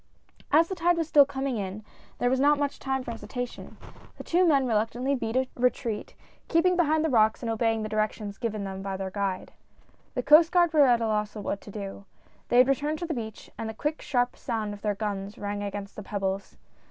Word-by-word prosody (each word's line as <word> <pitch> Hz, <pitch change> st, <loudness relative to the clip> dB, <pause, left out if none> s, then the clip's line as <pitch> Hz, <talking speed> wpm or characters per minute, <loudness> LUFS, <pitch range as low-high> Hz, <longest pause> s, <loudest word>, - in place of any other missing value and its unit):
As 320 Hz, +3 st, +5 dB
the 380 Hz, -, -4 dB
tide 350 Hz, -1 st, +2 dB
was 330 Hz, -2 st, -1 dB
still 290 Hz, -3 st, +6 dB
coming 270 Hz, -3 st, -2 dB
in 200 Hz, +1 st, -5 dB, 0.3 s
there 245 Hz, -, +1 dB
was 260 Hz, -, +2 dB
not 290 Hz, +2 st, +4 dB
much 285 Hz, -1 st, -2 dB
time 265 Hz, -1 st, -2 dB
for 235 Hz, -, -5 dB
hesitation. 245 Hz, +1 st, -6 dB, 0.4 s
The -, -, -8 dB
two 355 Hz, +1 st, +3 dB
men 280 Hz, -4 st, +4 dB
reluctantly 240 Hz, +4 st, 0 dB
beat 230 Hz, -3 st, -2 dB
a 260 Hz, 0 st, +2 dB
retreat; 240 Hz, -3 st, -1 dB, 0.3 s
keeping 360 Hz, +2 st, +3 dB
behind 315 Hz, -2 st, +2 dB
the -, -, +1 dB
rocks, 220 Hz, 0 st, +3 dB
and 230 Hz, -, -1 dB
obeying 225 Hz, -1 st, 0 dB
the -, -, -2 dB
directions 215 Hz, -1 st, -2 dB
given 215 Hz, -4 st, -2 dB
them 190 Hz, -1 st, -5 dB
by 195 Hz, -1 st, -4 dB
their 190 Hz, 0 st, -4 dB
guide. 195 Hz, -2 st, -3 dB, 0.6 s
The -, -, -1 dB
Coast 320 Hz, +2 st, +7 dB
Guard 345 Hz, -2 st, +3 dB
were 295 Hz, -3 st, +6 dB
at 240 Hz, -2 st, +4 dB
a 225 Hz, -, +1 dB
loss 210 Hz, 0 st, -1 dB
what 205 Hz, -1 st, -3 dB
to -, -, -12 dB
do. 200 Hz, -1 st, -7 dB, 0.4 s
They 245 Hz, -, +2 dB
had 250 Hz, +1 st, +7 dB
returned 295 Hz, +3 st, 0 dB
to 345 Hz, -, -4 dB
the 325 Hz, -, -2 dB
beach, 220 Hz, -5 st, -7 dB
and 225 Hz, -, -3 dB
the 220 Hz, -, -7 dB
quick, 300 Hz, +6 st, -2 dB
sharp 245 Hz, -2 st, 0 dB
sound 220 Hz, -3 st, -3 dB
of 205 Hz, -, -10 dB
their 210 Hz, -1 st, 0 dB
guns 200 Hz, -1 st, -4 dB
rang 205 Hz, 0 st, -4 dB
against 200 Hz, 0 st, -5 dB
the -, -, -6 dB
pebbles. 195 Hz, -1 st, -3 dB
230 Hz, 220 wpm, -27 LUFS, 210-285 Hz, 0.6 s, Coast